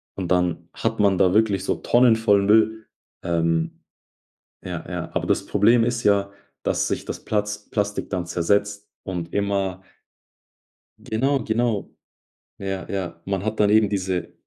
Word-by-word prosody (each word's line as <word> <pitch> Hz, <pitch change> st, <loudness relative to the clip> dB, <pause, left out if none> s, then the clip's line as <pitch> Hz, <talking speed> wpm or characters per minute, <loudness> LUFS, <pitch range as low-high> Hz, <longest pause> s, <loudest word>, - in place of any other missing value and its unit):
Und 95 Hz, -3 st, -4 dB
dann 90 Hz, -2 st, +1 dB
hat -, -, -2 dB
man 100 Hz, -2 st, +3 dB
da 90 Hz, -1 st, +4 dB
wirklich 105 Hz, -3 st, +2 dB
so -, -, 0 dB
Tonnen 120 Hz, -1 st, +4 dB
voll 105 Hz, -3 st, +3 dB
Müll. 110 Hz, +2 st, +3 dB, 0.4 s
Ähm, 85 Hz, -1 st, 0 dB, 0.8 s
ja, -, -, -5 dB
ja. -, -, -5 dB
Aber -, -, -1 dB
das -, -, +1 dB
Problem 115 Hz, +3 st, +4 dB
ist 120 Hz, 0 st, -1 dB
ja, 100 Hz, -1 st, +3 dB, 0.3 s
dass -, -, 0 dB
sich -, -, -2 dB
das -, -, -7 dB
Platz 105 Hz, 0 st, -2 dB
Plastik 105 Hz, -1 st, -2 dB
dann 90 Hz, -3 st, -2 dB
zersetzt 100 Hz, +4 st, 0 dB
und 85 Hz, -2 st, -5 dB
immer 100 Hz, -2 st, -1 dB, 1.2 s
Genau, 125 Hz, +5 st, 0 dB
genau. 110 Hz, -2 st, -1 dB, 0.7 s
Ja, 95 Hz, -1 st, -4 dB
ja. 90 Hz, -4 st, -4 dB
Man 100 Hz, -1 st, -2 dB
hat 110 Hz, 0 st, -2 dB
dann 105 Hz, 0 st, +4 dB
eben 110 Hz, -1 st, +5 dB
diese 95 Hz, -3 st, -2 dB
100 Hz, 150 wpm, -23 LUFS, 95-110 Hz, 1.2 s, eben